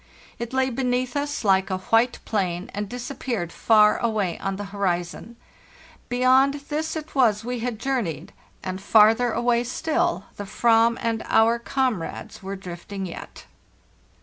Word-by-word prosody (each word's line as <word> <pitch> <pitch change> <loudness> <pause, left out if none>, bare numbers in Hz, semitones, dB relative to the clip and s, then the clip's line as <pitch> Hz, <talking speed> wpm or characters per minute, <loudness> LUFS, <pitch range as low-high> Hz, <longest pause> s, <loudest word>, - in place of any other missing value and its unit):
It 235 0 -4
lay 260 0 +1
beneath 250 0 -1
us 290 -1 -2
like 190 -1 +3
a 185 - -1
white 225 +6 +2
plain, 185 -4 -2
and 205 0 -4
disappeared 245 -6 -4
far 215 -2 +4
away 215 -7 -1
on 195 0 -2
the 205 - -5
horizon. 185 +3 -2 0.7
Beyond 260 +3 +4
this 315 +2 -2
it 315 0 -6
was 225 -5 +2
we 245 0 -3
had 240 -1 -3
journeyed, 235 - -3 0.3
and 185 0 -4
farther 225 +4 +5
away 240 +1 +1
still 330 +8 -1
the 205 -1 -7
Aram 230 0 +5
and 225 -1 -1
our 230 +1 +4
comrades 250 -7 -2
were 195 +1 -5
drifting 190 +1 -7
yet. 175 - -9
230 Hz, 145 wpm, -24 LUFS, 195-255 Hz, 0.7 s, farther